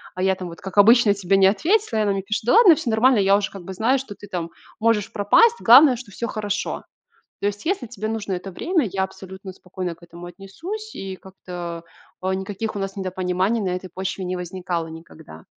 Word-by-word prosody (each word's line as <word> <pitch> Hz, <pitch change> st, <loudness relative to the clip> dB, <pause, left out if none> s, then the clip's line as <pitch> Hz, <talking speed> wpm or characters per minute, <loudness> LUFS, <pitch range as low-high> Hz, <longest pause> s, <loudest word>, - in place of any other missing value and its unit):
а 185 Hz, -, -2 dB
я 190 Hz, 0 st, +2 dB
там 185 Hz, -1 st, -7 dB
вот, 170 Hz, -, -12 dB
как 190 Hz, +1 st, -8 dB
обычно, 220 Hz, +1 st, +6 dB
тебе 195 Hz, -1 st, 0 dB
не 190 Hz, 0 st, +6 dB
ответила",- 320 Hz, -, +1 dB
и -, -, +3 dB
она 205 Hz, -, +1 dB
мне 195 Hz, -, -2 dB
пишет: 215 Hz, +3 st, -3 dB
"Да 240 Hz, -, +3 dB
ладно, 420 Hz, -8 st, +8 dB
всё 300 Hz, -6 st, -4 dB
нормально. 240 Hz, +3 st, +4 dB
Я 195 Hz, 0 st, +4 dB
уже 205 Hz, -1 st, -3 dB
как 195 Hz, -3 st, -10 dB
бы 190 Hz, -, -7 dB
знаю, 230 Hz, +8 st, +1 dB
что 250 Hz, -6 st, -8 dB
ты 205 Hz, -, -12 dB
там 175 Hz, -3 st, -4 dB, 0.3 s
можешь 225 Hz, -2 st, +1 dB
пропасть, 450 Hz, -, +4 dB
главное, 255 Hz, +3 st, +8 dB
что 235 Hz, -4 st, -11 dB
всё 235 Hz, +4 st, -4 dB
хорошо. 210 Hz, -2 st, -3 dB, 0.6 s
То -, -, -1 dB
есть, 205 Hz, 0 st, -6 dB
если 360 Hz, -8 st, -1 dB
тебе 215 Hz, -2 st, -5 dB
нужно 220 Hz, -3 st, -3 dB
это 185 Hz, +2 st, -6 dB
время, 335 Hz, -, 0 dB
я 190 Hz, -1 st, 0 dB
абсолютно 190 Hz, 0 st, -9 dB
спокойно 180 Hz, -1 st, -6 dB
к 165 Hz, -, -28 dB
этому 170 Hz, +1 st, -11 dB
отнесусь",- 330 Hz, -, -8 dB
и 190 Hz, -1 st, -6 dB
как-то, 175 Hz, -3 st, -8 dB, 0.4 s
а, 190 Hz, +1 st, -1 dB
никаких 200 Hz, +3 st, -4 dB
у -, -, -2 dB
нас 195 Hz, 0 st, -4 dB
недопониманий 185 Hz, +3 st, -1 dB
на 190 Hz, -, -1 dB
этой 180 Hz, +1 st, -4 dB
почве 190 Hz, +1 st, -4 dB
не 185 Hz, +1 st, -2 dB
возникало 175 Hz, -2 st, -4 dB
никогда. 160 Hz, -, -12 dB
195 Hz, 220 wpm, -22 LUFS, 185-225 Hz, 0.6 s, ладно